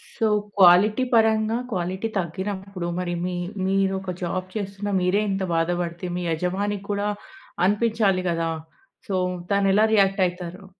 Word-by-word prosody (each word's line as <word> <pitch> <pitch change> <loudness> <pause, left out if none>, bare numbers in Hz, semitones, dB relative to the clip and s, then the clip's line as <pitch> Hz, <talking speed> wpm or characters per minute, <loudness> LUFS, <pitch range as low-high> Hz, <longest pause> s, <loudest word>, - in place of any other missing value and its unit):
So, 225 - +1 0.3
quality 195 +7 +6
పరంగా 220 0 +3
quality 185 +3 -2
తగ్గినప్పుడు, 190 +1 -4
మరి 175 -1 -2
మీ 180 -1 -2 0.3
మీరొక 190 -1 0
జాబ్ 185 +2 -2
చేస్తున్న 200 0 -4
మీరే 185 +3 +2
ఇంత 195 0 -1
బాధ 165 +1 +1
పడితే, 170 +1 -5
మీ 180 - -3
యజమాని 190 +5 -1
కూడా 205 0 0 0.6
అనిపించాలి 205 -2 +2
గదా! 165 -1 0 0.6
సో 195 - -1 0.4
తనెలా 200 +1 +3
రియాక్ట్ 195 -1 +3
అయి‌‌తారు? 180 +2 -6
195 Hz, 130 wpm, -24 LUFS, 180-205 Hz, 0.6 s, quality